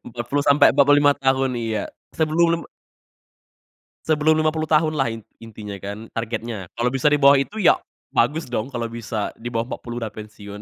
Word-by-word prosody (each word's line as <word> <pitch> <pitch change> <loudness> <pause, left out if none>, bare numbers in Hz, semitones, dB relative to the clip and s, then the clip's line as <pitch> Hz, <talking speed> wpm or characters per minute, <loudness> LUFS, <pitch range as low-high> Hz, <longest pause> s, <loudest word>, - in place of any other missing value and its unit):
40 120 +4 -2
sampe 145 +1 +5
45 145 +1 +5
tahun 135 -1 +1
iya 110 -2 -2 0.3
sebelum 160 +2 +2
lim 165 0 0 1.4
sebelum 155 0 +3
50 155 0 0
tahun 155 0 +3
lah 135 -6 0
in 115 0 -7 0.2
intinya 105 -2 -8
kan 100 +3 -7
targetnya 115 -4 -4
kalau 120 +1 +1
bisa 135 +2 +2
di 150 - +3
bawah 140 0 +6
itu 200 +11 -3
ya 195 - +5 0.4
bagus 150 +7 +1
dong 120 +1 -3
kalo 120 -2 -3
bisa 110 -2 -4
di 120 +1 -7
bawah 115 0 -1
40 120 0 -7
udah 110 -2 -4
pensiun 105 -1 -10
125 Hz, 170 wpm, -22 LUFS, 115-150 Hz, 1.4 s, bawah